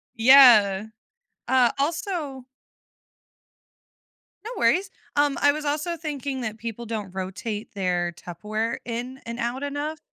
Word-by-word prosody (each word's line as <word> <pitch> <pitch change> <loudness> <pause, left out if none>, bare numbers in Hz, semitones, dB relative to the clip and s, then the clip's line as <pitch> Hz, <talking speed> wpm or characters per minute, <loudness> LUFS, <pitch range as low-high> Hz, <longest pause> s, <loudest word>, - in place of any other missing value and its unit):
Yeah. 225 -5 +7 0.6
Uh, 255 -3 +4
also 305 -3 -2 2.0
No 455 - -6
worries. 385 +1 +2 0.3
Um, 290 -1 +2
I 285 - +6
was 300 0 -5
also 310 +4 -2
thinking 285 -4 -4
that 220 -1 -4
people 230 +1 -6
don't 210 -4 -5
rotate 205 +4 -5
their 180 -3 -1
Tupperware 215 +7 -4
in 245 +3 -5
and 235 0 -6
out 245 +4 -2
enough. 290 +2 -4
245 Hz, 120 wpm, -24 LUFS, 215-290 Hz, 2.0 s, Yeah